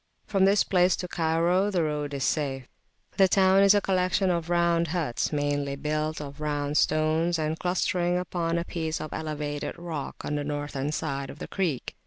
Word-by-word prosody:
From 195 -2 +2
this 200 +1 +4
place 180 -1 +3
to 180 - -5
Cairo 170 +4 +1
the 180 -5 +1
road 150 -2 -2
is 135 - -2
safe. 135 -4 -1 0.5
The 195 - +6
town 190 +1 +4
is 200 +1 +6
a 205 - +3
collection 185 0 +1
of 170 -1 -2
round 170 -1 +2
huts 160 -7 -1
meanly 145 -1 -1
built 155 +2 -2
of 145 0 -8
round 145 -1 -2
stones, 155 +2 +2
and 155 0 -2
clustering 180 -1 0
upon 170 -2 -1
a 170 - -2
piece 160 -2 -3
of 155 - -6
elevated 150 -2 -4
rock 165 -4 -6
on - - -2
the 145 - -2
northern 145 -1 -3
side 140 -3 -3
of - - -9
the - - -7
creek. 170 -10 -2
160 Hz, 185 wpm, -27 LUFS, 145-180 Hz, 0.5 s, The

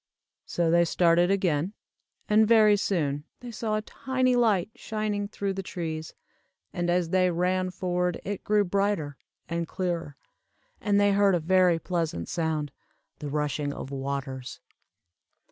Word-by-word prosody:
'" - - -61
So 170 -2 0
they 170 0 +5
started 170 +1 +3
again, 185 -2 +1 0.5
and 215 +1 +4
very 215 -2 +6
soon 150 -8 -1 0.2
they 245 -1 -7
saw 220 -1 -2
a 215 - -2
tiny 255 +1 0
light 220 -5 +2
shining 215 -2 -3
through 200 -1 -3
the 195 - -4
trees, 160 -4 -5 0.6
and 175 0 -1
as 175 -1 +1
they 185 -1 +3
ran 185 +2 0
forward 180 -1 -1
it 200 -1 -4
grew 210 0 +3
brighter, 195 -6 0 0.3
and 170 -1 -2
clearer, 170 -6 -3 0.6
and 205 -1 +2
they 205 0 +4
heard 200 -1 +4
a - - +1
very 180 +1 +3
pleasant 165 - -3
sound, 155 -3 -1 0.5
the 145 - -5
rushing 150 0 -1
of 135 - -7
waters. 135 -1 -4
180 Hz, 145 wpm, -27 LUFS, 160-205 Hz, 0.6 s, very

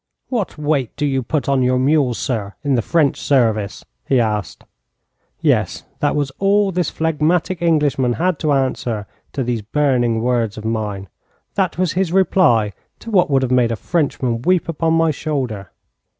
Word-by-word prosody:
'What 225 -10 -2
weight 145 -5 0
do 150 - -1
you 135 -2 0
put 140 +4 -2
on 135 -1 +2
your 125 0 +2
mules, 135 -2 +2
sir, 105 -6 -3
in 140 -2 +1
the 120 - +2
French 150 +3 +1
service?' 110 -7 +1 0.2
he 130 - +3
asked. 105 -3 -2 0.8
Yes, - - +1 0.2
that 145 - +1
was 145 -2 -1
all 200 0 +3
this 180 -1 0
phlegmatic 160 +3 0
Englishman 145 -7 +2
had 175 +3 0
to 155 - 0
answer 125 -6 -1 0.3
to 135 - -1
these 120 -2 -2
burning 120 -1 +1
words 120 -4 0
of 110 - -7
mine. 105 -3 -3 0.5
That 190 -5 0
was 180 -3 +1
his 185 -2 0
reply 160 - +3 0.2
to 230 - -9
what 180 -6 +3
would 135 -2 +2
have 130 - -1
made 125 -2 +3
a - - 0
Frenchman 130 -5 -1
weep 180 +4 +2
upon 165 0 0
my 165 -1 +3
shoulder. 130 - -3
135 Hz, 170 wpm, -19 LUFS, 120-165 Hz, 0.8 s, he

